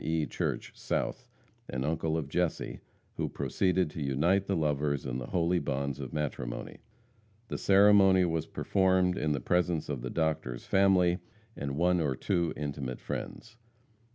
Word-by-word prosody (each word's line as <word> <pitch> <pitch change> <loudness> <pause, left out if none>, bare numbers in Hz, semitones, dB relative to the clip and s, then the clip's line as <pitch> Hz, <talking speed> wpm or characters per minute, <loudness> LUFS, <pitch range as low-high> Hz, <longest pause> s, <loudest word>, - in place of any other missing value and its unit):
E. 80 -1 0
Church, - - -3
South, - - -3 0.4
an 65 0 -2
uncle 80 +2 0
of 75 -4 -3
Jesse, 85 +3 -1 0.4
who - - -1
proceeded 90 -4 0
to 80 - -6
unite 80 +9 +1
the 100 - +1
lovers 75 -3 0
in 65 -1 -3
the - - -6
holy 85 0 +1
bonds 70 -1 -2
of - - -6
matrimony. 65 -5 -4 0.7
The - - -3
ceremony 95 -2 +6
was 80 -2 -1
performed 95 -2 +2
in 75 0 0
the 70 - -1
presence 85 +3 0
of 70 -5 -3
the 65 - -4
Doctor's 80 -7 -2
family 95 -2 +3 0.4
and 70 0 -4
one 90 +1 +3
or 70 -4 0
two 85 +2 0
intimate 70 -4 -4
friends. 115 0 -6
80 Hz, 155 wpm, -30 LUFS, 70-90 Hz, 0.7 s, ceremony